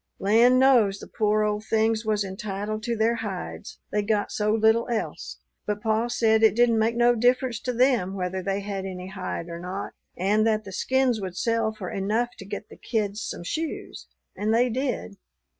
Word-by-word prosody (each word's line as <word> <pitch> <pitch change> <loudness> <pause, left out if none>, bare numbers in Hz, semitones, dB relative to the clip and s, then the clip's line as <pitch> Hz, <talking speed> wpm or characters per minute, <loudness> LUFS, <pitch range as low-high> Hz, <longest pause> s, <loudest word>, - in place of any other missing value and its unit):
Land 230 +5 +4
knows 245 -7 +4
the - - -10
pore 215 -1 +1
old 210 0 -1
things 220 0 +1
was 215 -2 0
entitled 205 +2 -4
to 235 +1 -2
their 230 +2 +1
hides, 205 -2 -6
they 210 - +1
got 205 0 0
so 210 0 0
little 220 +1 +3
else; 230 -2 -3 0.3
but 210 0 -1
pa 220 +2 +1
said 225 -2 +2
it 220 -1 +5
didn't 235 -1 +4
make 225 +1 +1
no 240 0 +4
difference 245 0 +1
to 250 - -3
them 240 -6 +2
whether 185 0 -2
they 195 +1 -2
had 195 -1 -4
any 185 -1 -6
hide 185 -3 -5
or 170 0 -7
not, 185 +3 -5 0.2
and 205 +4 +2
that 215 -1 +1
the 195 - -9
skins 260 -1 +1
would 185 -2 -6
sell 230 -1 +1
for 220 - -7
enough 215 +4 0
to 195 - -8
get 205 +1 -6
the - - -14
kids 210 -2 -2
some - - -5
shoes. 315 - -5 0.3
And 210 +2 -1
they 240 +2 +3
did. 255 -5 -3
215 Hz, 190 wpm, -25 LUFS, 200-235 Hz, 0.3 s, it